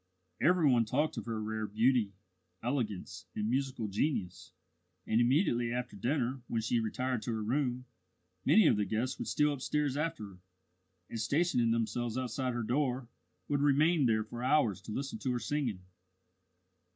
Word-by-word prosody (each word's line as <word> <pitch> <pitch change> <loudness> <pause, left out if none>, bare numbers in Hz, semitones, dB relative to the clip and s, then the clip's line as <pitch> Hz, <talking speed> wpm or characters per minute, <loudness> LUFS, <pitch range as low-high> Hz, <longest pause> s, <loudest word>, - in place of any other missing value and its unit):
Every 175 -1 +4
one 120 -4 +5
talked 140 +8 0
of - - -5
her 115 -2 -2
rare 110 0 -3
beauty, 110 -1 +2 0.5
elegance, 105 -7 -3
and 105 0 -1
musical 130 -2 -1
genius, 100 - -2 0.5
and 110 +2 +2
immediately 120 -2 +2
after 125 0 -3
dinner, 125 +3 -1
when 115 - -1
she 115 +2 +1
retired 125 +2 -1
to 120 - -3
her 110 -1 -2
room, 125 +1 -1 0.6
many 215 - +6
of - - +5
the 105 - +1
guests 110 +6 -2
would - - -4
steal 150 0 +2
upstairs 145 0 -1
after 160 -4 -2
her, 95 -2 -13 0.7
and, 115 - -5
stationing 130 -1 +2
themselves 115 +1 -1
outside 130 0 -2
her 120 - -1
door, 125 0 -1 0.4
would 145 -1 0
remain 145 +1 +4
there 110 -1 +2
for 120 +2 -8
hours 125 -8 +2
to 105 - -9
listen 140 - -4
to 130 - -1
her 120 - -1
singing. 120 -10 -2
120 Hz, 165 wpm, -32 LUFS, 110-140 Hz, 0.7 s, many